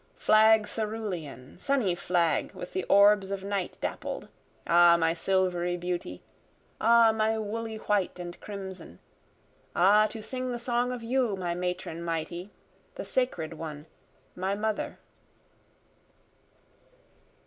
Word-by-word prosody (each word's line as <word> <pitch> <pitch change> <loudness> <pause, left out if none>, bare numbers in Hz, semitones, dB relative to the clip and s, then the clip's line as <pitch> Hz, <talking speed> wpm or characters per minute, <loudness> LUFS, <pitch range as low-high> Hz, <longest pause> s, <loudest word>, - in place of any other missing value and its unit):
Flag 220 0 +5
cerulean 200 - -5
sunny 260 -10 +1
flag, 175 -2 0
with 180 - -8
the 185 - -1
orbs 200 -1 +5
of 195 -1 -4
night 195 -2 -3
dappled! - - -4 0.4
Ah 170 0 +6
my 165 -1 +2
silvery 175 -1 0
beauty 175 - -4 0.6
ah 230 0 +6
my 220 0 +1
woolly 220 +1 -4
white 205 -4 -1
and 175 -1 -8
crimson! 190 - -8 0.8
Ah 205 +4 +5
to 220 0 -8
sing 255 +2 -4
the 240 - -2
song 240 +1 0
of 245 -2 -5
you, 240 -3 +1
my 180 -2 -2
matron 180 -1 -4
mighty! 170 +3 -4 0.5
My - - -4
sacred 175 -11 -1
one, 155 -2 -7 0.5
my 190 +2 -1
mother. 215 0 -2
195 Hz, 120 wpm, -28 LUFS, 175-220 Hz, 0.8 s, Ah